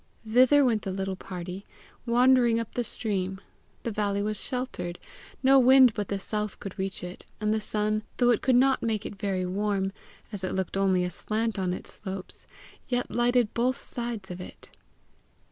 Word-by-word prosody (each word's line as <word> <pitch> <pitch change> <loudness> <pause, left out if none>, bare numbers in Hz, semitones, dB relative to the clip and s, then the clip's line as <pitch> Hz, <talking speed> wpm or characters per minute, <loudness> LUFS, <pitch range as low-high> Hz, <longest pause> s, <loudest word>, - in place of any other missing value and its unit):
Thither 255 +5 +6
went 225 -4 +2
the 195 - -4
little 190 0 -2
party, 185 +1 -7 0.4
wandering 240 -1 +5
up 230 - -4
the 245 - -1
stream: 190 -4 -2 0.4
the 230 - -2
valley 200 -1 0
was 215 0 -1
sheltered; 250 -9 -4 0.5
no 270 +1 +7
wind 260 -1 +7
but 205 -2 -3
the 200 - -2
south 210 +1 -3
could 195 0 -8
reach 190 -1 -3
it; 180 +1 -7 0.2
and 215 0 +1
the 220 - 0
sun, 215 0 0 0.2
though 245 -1 +4
it 230 - +2
could 260 -1 +3
not 265 +1 +4
make 220 -2 -1
it - - -5
very 190 -2 -1
warm, 195 +1 -1 0.4
as 200 -3 -6
it 185 - -2
looked 190 -1 -2
only 190 -2 +2
aslant 215 +5 -2
on 185 -1 0
its 180 - -7
slopes, 190 -2 -5 0.4
yet 245 -1 -1
lighted 240 -2 +2
both 250 +2 +1
sides 235 -6 -4
of 180 0 -6
it. - - -11
210 Hz, 180 wpm, -27 LUFS, 190-240 Hz, 0.5 s, no